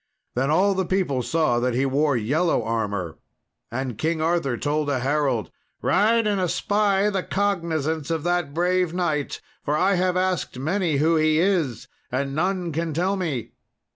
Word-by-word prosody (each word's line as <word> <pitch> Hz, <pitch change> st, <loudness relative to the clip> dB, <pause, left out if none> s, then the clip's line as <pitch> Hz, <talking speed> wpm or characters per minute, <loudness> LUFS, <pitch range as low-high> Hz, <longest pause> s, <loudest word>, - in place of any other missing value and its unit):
Then 130 Hz, +3 st, 0 dB
all 190 Hz, +6 st, +3 dB
the 190 Hz, 0 st, 0 dB
people 180 Hz, -9 st, 0 dB
saw 155 Hz, -2 st, +1 dB
that 125 Hz, 0 st, 0 dB
he 135 Hz, +2 st, +2 dB
wore 140 Hz, 0 st, +2 dB
yellow 150 Hz, +10 st, +1 dB
armour. 100 Hz, -8 st, -2 dB, 0.5 s
And 125 Hz, -2 st, -4 dB
King 160 Hz, +1 st, 0 dB
Arthur 160 Hz, -6 st, 0 dB
told 150 Hz, +2 st, -1 dB
a 140 Hz, -, +1 dB
herald, 135 Hz, -5 st, 0 dB, 0.3 s
"Ride 225 Hz, +4 st, +3 dB
and 205 Hz, -2 st, +1 dB
espy 200 Hz, +2 st, +1 dB
the 195 Hz, -2 st, 0 dB
cognizance 165 Hz, -7 st, -1 dB
of 165 Hz, -2 st, -1 dB
that 175 Hz, -4 st, 0 dB
brave 180 Hz, +1 st, +1 dB
knight, 160 Hz, -6 st, -1 dB, 0.2 s
for 150 Hz, +1 st, 0 dB
I 190 Hz, +4 st, +3 dB
have 180 Hz, 0 st, +1 dB
asked 185 Hz, -7 st, -1 dB
many 160 Hz, +2 st, 0 dB
who 160 Hz, +3 st, +3 dB
he 155 Hz, 0 st, +3 dB
is, 165 Hz, -, +1 dB, 0.2 s
and 135 Hz, +2 st, -1 dB
none 180 Hz, +2 st, -1 dB
can 160 Hz, 0 st, -2 dB
tell 185 Hz, +4 st, +1 dB
me." 160 Hz, -, -3 dB
160 Hz, 165 wpm, -24 LUFS, 140-185 Hz, 0.5 s, all